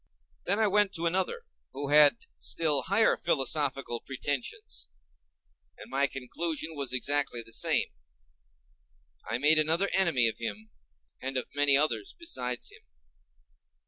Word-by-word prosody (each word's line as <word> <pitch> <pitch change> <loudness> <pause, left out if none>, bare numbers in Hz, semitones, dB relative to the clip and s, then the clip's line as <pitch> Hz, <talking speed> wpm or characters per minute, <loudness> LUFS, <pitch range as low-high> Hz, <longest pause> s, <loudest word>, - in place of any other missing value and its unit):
Then 200 - +1
I 220 - +2
went 205 -1 +2
to 170 0 -4
another, 190 - -1 0.3
who 140 +1 -4
had 150 0 +7 0.2
still 150 -4 +1
higher 200 +4 +3
philosophical 135 -5 0
pretensions, 135 0 -5 0.9
and - - -13
my 140 +1 +1
conclusion 155 +5 -3
was 140 -4 -3
exactly 130 -1 0
the 115 - -9
same. - - +2 1.4
I 115 - -1
made 150 +4 +4
another 165 +6 +2
enemy 165 -11 +3
of 110 - -4
him, 110 -1 -6 0.5
and 135 0 -3
of 130 - -5
many 145 -1 +4
others 155 - 0
besides 125 - -3
him. - - -17
145 Hz, 130 wpm, -28 LUFS, 130-170 Hz, 1.4 s, had